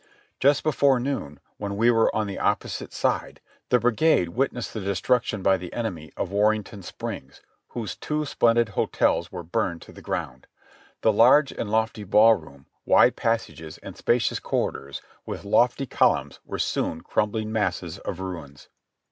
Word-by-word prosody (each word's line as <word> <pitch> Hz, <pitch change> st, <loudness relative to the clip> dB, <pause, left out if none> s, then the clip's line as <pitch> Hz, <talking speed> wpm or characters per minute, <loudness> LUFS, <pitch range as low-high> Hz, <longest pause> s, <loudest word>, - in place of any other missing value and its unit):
Just 140 Hz, +1 st, +3 dB
before 140 Hz, -4 st, +3 dB
noon, 120 Hz, -, -4 dB, 0.2 s
when 100 Hz, -1 st, -4 dB
we 115 Hz, +3 st, +4 dB
were 115 Hz, -1 st, +3 dB
on 110 Hz, -, +1 dB
the 100 Hz, -1 st, -5 dB
opposite -, -, -1 dB
side, -, -, -1 dB, 0.3 s
the 125 Hz, -, +5 dB
brigade 120 Hz, -, +2 dB
witnessed 125 Hz, +3 st, -2 dB
the 110 Hz, -, -4 dB
destruc 100 Hz, +6 st, +1 dB
tion 105 Hz, -3 st, -4 dB
by 95 Hz, -1 st, +4 dB
the 90 Hz, -1 st, -8 dB
enemy 90 Hz, -10 st, -4 dB
of 95 Hz, -, -3 dB
Warrenton 105 Hz, 0 st, 0 dB
Springs, -, -, -7 dB, 0.3 s
whose 115 Hz, -5 st, -5 dB
two 150 Hz, 0 st, -2 dB
splendid 120 Hz, -4 st, +2 dB
hotels 85 Hz, -3 st, 0 dB
were 90 Hz, -2 st, -6 dB
burned 90 Hz, -1 st, -2 dB
to -, -, -14 dB
the -, -, -13 dB
ground. 65 Hz, 0 st, -5 dB, 0.5 s
The 110 Hz, -, +3 dB
large 130 Hz, +6 st, +5 dB
and 105 Hz, -, -5 dB
lofty 110 Hz, 0 st, 0 dB
ball 110 Hz, +3 st, +6 dB
room, 75 Hz, -8 st, -9 dB, 0.2 s
wide -, -, +5 dB
passages 110 Hz, -9 st, -2 dB
and -, -, -8 dB
spacious 120 Hz, -1 st, +1 dB
corridors 70 Hz, 0 st, -3 dB, 0.2 s
with -, -, -6 dB
lofty 120 Hz, +6 st, +2 dB
columns -, -, +1 dB
were -, -, -6 dB
soon 80 Hz, -, -1 dB
crumbling 110 Hz, +1 st, -1 dB
masses 105 Hz, -5 st, -2 dB
of -, -, -5 dB
ruins. 85 Hz, -7 st, -8 dB
110 Hz, 160 wpm, -25 LUFS, 90-120 Hz, 0.5 s, ball